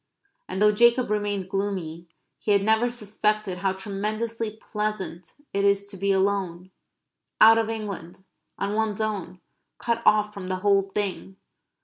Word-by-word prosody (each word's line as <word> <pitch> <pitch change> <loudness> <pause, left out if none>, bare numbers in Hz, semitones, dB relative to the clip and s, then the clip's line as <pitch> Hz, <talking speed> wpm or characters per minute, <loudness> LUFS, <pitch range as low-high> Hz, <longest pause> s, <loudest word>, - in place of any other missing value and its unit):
And - - -4
though 210 0 +6
Jacob 235 +2 +4
remained 205 -3 -1
gloomy 185 -4 -3 0.3
he 210 - +1
had 200 -1 +3
never 220 +3 +3
suspected 210 -4 -1
how 190 0 +1
tremendously 215 +4 -3
pleasant 210 -6 -4 0.2
it 200 - +1
is 200 0 +3
to - - -8
be 200 +1 +1
alone; 190 -2 0 0.7
out 225 +1 +8
of 225 -1 -1
England; 200 -5 -6 0.3
on 200 +1 -2
one's 220 -1 0
own; 205 -4 -3 0.4
cut 235 -1 -1
off 210 0 +4
from 195 -3 -7
the 185 - 0
whole 200 -1 +5
thing. 195 -1 -4
205 Hz, 145 wpm, -25 LUFS, 190-215 Hz, 0.7 s, out